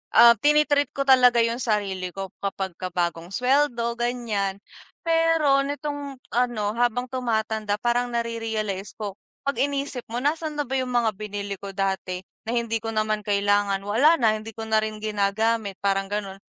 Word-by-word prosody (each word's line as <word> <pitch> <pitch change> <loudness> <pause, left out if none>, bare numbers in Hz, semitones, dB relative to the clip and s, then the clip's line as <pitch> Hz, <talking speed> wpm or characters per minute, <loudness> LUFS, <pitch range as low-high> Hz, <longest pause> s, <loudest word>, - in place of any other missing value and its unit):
ah, 235 0 +10
tini-treat 295 0 +3
ko 275 - 0
talaga 250 -3 +6
yung 230 +1 -1
sarili 200 -6 -1
ko 195 -1 -6
kapagka 190 -2 -4
bagong 170 -1 -1
suweldo 250 -2 +1
ganyan. 215 -5 -2 0.4
Pero 330 -4 +3
nitong 285 -1 -4 0.2
ano 235 -4 0
habang 245 +1 0
tumatanda 220 -4 -1
parang 245 0 +1
nare-realize 225 -4 -3
ko, 205 -2 -6 0.3
pag 280 0 -2
inisip 280 -3 -2
mo 240 +3 -4
nasan 310 +1 -1
na 295 - 0
ba 265 - -14
yung 255 -1 -3
mga 230 -2 +3
binili 205 -2 -5
ko 200 -1 -7
dati? 190 -2 -2 0.2
Na 235 - -1
hindi 230 -1 0
ko 225 - -7
naman 215 0 +1
kailangan. 200 -1 +2
Wala 245 +11 +4
na 220 -7 +2
hindi 220 0 -10
ko 225 - -5
na 220 0 +2
rin 215 0 -4
ginagamit 215 0 0
parang 195 0 +1
gano'n. 200 -1 -4
225 Hz, 160 wpm, -25 LUFS, 205-250 Hz, 0.4 s, ah